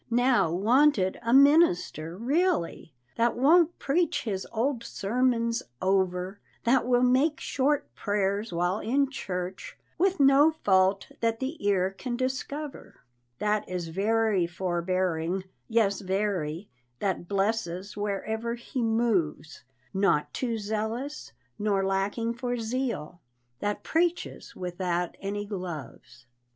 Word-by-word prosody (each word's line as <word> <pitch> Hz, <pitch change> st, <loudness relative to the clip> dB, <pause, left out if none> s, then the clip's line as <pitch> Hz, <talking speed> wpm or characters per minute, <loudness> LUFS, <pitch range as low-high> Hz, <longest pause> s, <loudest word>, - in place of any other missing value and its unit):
Now, 245 Hz, -7 st, +3 dB
"wanted, 215 Hz, -, +3 dB
a 230 Hz, -, -1 dB
minister," 265 Hz, -, +4 dB
really, 260 Hz, -, 0 dB, 0.3 s
That 235 Hz, +1 st, +2 dB
won't 330 Hz, +6 st, +4 dB
preach 330 Hz, +4 st, 0 dB
his 195 Hz, -4 st, -3 dB
old 235 Hz, +1 st, -1 dB
sermons 235 Hz, +2 st, 0 dB, 0.2 s
over, 190 Hz, 0 st, 0 dB, 0.2 s
That 245 Hz, +1 st, +3 dB
will 245 Hz, 0 st, +3 dB
make 265 Hz, +5 st, +3 dB
short 285 Hz, +2 st, 0 dB
prayers 205 Hz, +1 st, -1 dB
while 175 Hz, +4 st, 0 dB
in 275 Hz, +5 st, +1 dB
church, 180 Hz, -7 st, -5 dB, 0.2 s
With 380 Hz, 0 st, +2 dB
no 275 Hz, +2 st, +6 dB
fault 190 Hz, 0 st, +3 dB
that 230 Hz, -1 st, 0 dB
the 270 Hz, +2 st, -4 dB
ear 190 Hz, -2 st, +2 dB
can 240 Hz, +5 st, -5 dB
discover, 270 Hz, +3 st, -4 dB, 0.4 s
That 210 Hz, +4 st, 0 dB
is 180 Hz, -2 st, -3 dB
very 205 Hz, 0 st, +1 dB
forbearing, 175 Hz, 0 st, -1 dB, 0.2 s
yes 220 Hz, -4 st, +2 dB
very, 190 Hz, -3 st, -2 dB, 0.3 s
That 185 Hz, +2 st, -2 dB
blesses 200 Hz, -1 st, -1 dB
wherever 220 Hz, +3 st, -2 dB
he 240 Hz, +2 st, -5 dB
moves 200 Hz, -, 0 dB, 0.3 s
Not 190 Hz, -6 st, +1 dB
too 235 Hz, -3 st, -2 dB
zealous, 220 Hz, +7 st, -4 dB, 0.3 s
nor 200 Hz, -2 st, +1 dB
lacking 200 Hz, +4 st, 0 dB
for 245 Hz, 0 st, -3 dB
zeal, 225 Hz, -, -3 dB, 0.4 s
That 205 Hz, 0 st, -2 dB
_preaches 345 Hz, +1 st, -1 dB
without 180 Hz, -1 st, -2 dB
any 205 Hz, +1 st, -3 dB
gloves! 170 Hz, -, -7 dB
210 Hz, 115 wpm, -27 LUFS, 185-250 Hz, 0.4 s, no